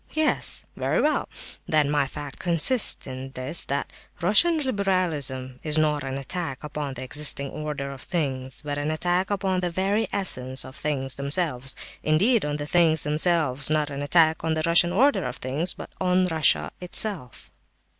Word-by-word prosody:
Yes. 310 Hz, 0 st, +3 dB
Very -, -, -1 dB
well. 305 Hz, +1 st, 0 dB, 0.4 s
Then 150 Hz, -2 st, +1 dB
my 145 Hz, -2 st, +1 dB
'fact' 140 Hz, +1 st, -9 dB
consists 180 Hz, +8 st, +4 dB
in 130 Hz, 0 st, -8 dB
this, 135 Hz, +6 st, +4 dB
that 140 Hz, +1 st, -4 dB, 0.3 s
Russian 215 Hz, -, +4 dB
liberalism 175 Hz, -, -2 dB
is 155 Hz, 0 st, 0 dB
not 150 Hz, -2 st, +1 dB
an 135 Hz, 0 st, -5 dB
attack 145 Hz, 0 st, -5 dB
upon 150 Hz, -2 st, -5 dB
the 130 Hz, -, -7 dB
existing 140 Hz, 0 st, 0 dB
order 150 Hz, -2 st, -5 dB
of 135 Hz, -1 st, -10 dB
things, 135 Hz, -6 st, -4 dB
but 145 Hz, 0 st, -3 dB
an 145 Hz, +1 st, -2 dB
attack 175 Hz, +4 st, -1 dB
upon 190 Hz, -2 st, -1 dB
the 180 Hz, -1 st, -2 dB
very 195 Hz, +5 st, -1 dB
essence 130 Hz, -9 st, 0 dB
of 130 Hz, +1 st, -12 dB
things 135 Hz, -4 st, -2 dB
themselves—indeed, 155 Hz, -, -1 dB
on 145 Hz, 0 st, -2 dB
the 145 Hz, 0 st, -5 dB
things 160 Hz, -1 st, +3 dB
themselves; 150 Hz, -3 st, +1 dB
not 150 Hz, -1 st, 0 dB
an 140 Hz, 0 st, -5 dB
attack 160 Hz, +2 st, +2 dB
on 160 Hz, 0 st, -1 dB
the 155 Hz, -, -2 dB
Russian 170 Hz, +1 st, +4 dB
order 265 Hz, +10 st, +2 dB
of 125 Hz, 0 st, -5 dB
things, 145 Hz, +8 st, -2 dB
but -, -, -10 dB
on 185 Hz, 0 st, +2 dB
Russia 160 Hz, -4 st, +1 dB
itself. 180 Hz, -, 0 dB
155 Hz, 165 wpm, -24 LUFS, 140-180 Hz, 0.4 s, consists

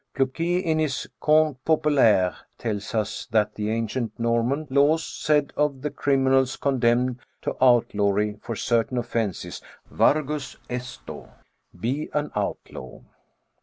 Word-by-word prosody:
Pluquet 165 Hz, +7 st, 0 dB
in 160 Hz, -3 st, 0 dB
his 150 Hz, -5 st, -1 dB
Contes 155 Hz, -3 st, +3 dB
Populaires 135 Hz, -, +3 dB, 0.2 s
tells 105 Hz, -2 st, -4 dB
us 110 Hz, -1 st, -2 dB
that 105 Hz, -1 st, +1 dB
the 105 Hz, 0 st, -3 dB
ancient 115 Hz, 0 st, -2 dB
Norman 115 Hz, +6 st, 0 dB
laws 145 Hz, +4 st, +3 dB
said 150 Hz, -2 st, 0 dB
of 145 Hz, -3 st, 0 dB
the 150 Hz, -, -2 dB
criminals 135 Hz, -1 st, +2 dB
condemned 125 Hz, -2 st, +1 dB, 0.2 s
to -, -, -2 dB
outlawry 105 Hz, -4 st, +2 dB
for 115 Hz, -, -5 dB
certain 120 Hz, +3 st, 0 dB
offences, 115 Hz, -5 st, -3 dB, 0.3 s
Wargus 150 Hz, -1 st, +1 dB
esto: 125 Hz, 0 st, -7 dB, 0.5 s
be 135 Hz, +7 st, -2 dB
an 150 Hz, 0 st, -1 dB
outlaw 105 Hz, -1 st, -5 dB
130 Hz, 120 wpm, -24 LUFS, 115-145 Hz, 0.5 s, Contes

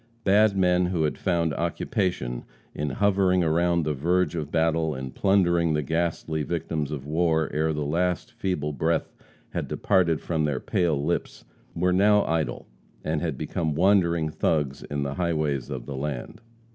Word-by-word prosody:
Bad 100 Hz, 0 st, +4 dB
men 90 Hz, -1 st, +3 dB
who 90 Hz, -3 st, 0 dB
had 75 Hz, -, -1 dB
found 85 Hz, -4 st, +1 dB
occupation 85 Hz, -, -2 dB, 0.3 s
in 75 Hz, 0 st, -2 dB
hovering 95 Hz, 0 st, +2 dB
about 85 Hz, +1 st, +2 dB
the 75 Hz, 0 st, 0 dB
verge 85 Hz, +4 st, +1 dB
of 75 Hz, -3 st, -4 dB
battle 80 Hz, -1 st, +1 dB
and 65 Hz, 0 st, -6 dB
plundering 85 Hz, -4 st, +2 dB
the 75 Hz, 0 st, 0 dB
ghastly 80 Hz, 0 st, -1 dB
victims 80 Hz, -2 st, -2 dB
of 70 Hz, -3 st, -5 dB
war 80 Hz, +1 st, +1 dB
ere 80 Hz, +1 st, +1 dB
the 75 Hz, -1 st, -2 dB
last 90 Hz, +8 st, -1 dB
feeble 90 Hz, -10 st, -2 dB
breath 80 Hz, +4 st, -1 dB, 0.4 s
had -, -, -3 dB
departed 90 Hz, -6 st, +2 dB
from 80 Hz, -3 st, -1 dB
their 70 Hz, -4 st, -1 dB
pale 80 Hz, -2 st, 0 dB
lips, 85 Hz, -, -2 dB, 0.3 s
were 90 Hz, +2 st, +2 dB
now 105 Hz, +2 st, +4 dB
idle 80 Hz, -7 st, -1 dB, 0.4 s
and 80 Hz, -1 st, -1 dB
had 80 Hz, -6 st, -2 dB
become 80 Hz, +2 st, -2 dB
wandering 85 Hz, -3 st, +3 dB
thugs 75 Hz, -4 st, 0 dB
in 70 Hz, -1 st, -3 dB
the 70 Hz, -1 st, -3 dB
highways 75 Hz, -6 st, -1 dB
of 65 Hz, -4 st, -5 dB
the 70 Hz, -, -6 dB
land. 70 Hz, -1 st, -5 dB
80 Hz, 160 wpm, -26 LUFS, 75-90 Hz, 0.4 s, Bad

